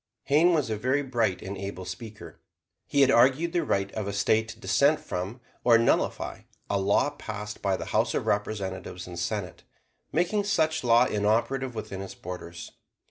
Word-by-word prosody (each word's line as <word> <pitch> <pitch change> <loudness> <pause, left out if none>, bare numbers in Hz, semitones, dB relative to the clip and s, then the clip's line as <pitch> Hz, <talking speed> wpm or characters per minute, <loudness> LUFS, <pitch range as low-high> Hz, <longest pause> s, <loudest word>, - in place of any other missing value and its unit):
Hayne 160 +5 +4
was 145 -7 0
a - - +1
very 130 +6 +1
bright 115 -8 0
and 100 +1 -5
able 95 -1 -6
speaker. 105 +4 -9 0.5
He 140 - +2
had 135 0 +6
argued 135 +8 +4
the 175 -2 +1
right 100 -8 0
of 105 -2 -4
a 100 - -3
State 110 +2 +2
to 110 0 -10
dissent 140 +6 +3
from, 95 +8 -5 0.2
or 120 -2 +6
nullify, 115 - +1 0.3
a 100 - +2
law 100 +9 +2
passed 105 -6 -7
by 95 -2 +1
the - - -5
House - - +2
of - - -1
Representatives 95 -3 -2
and 90 -1 -7
Senate, 95 -1 -3 0.5
making 180 +5 +1
such 160 -7 +1
law 120 0 +5
inoperative 115 +5 0
within 100 -3 -5
its 100 - -8
borders. 85 -1 -8
110 Hz, 175 wpm, -27 LUFS, 100-135 Hz, 0.5 s, had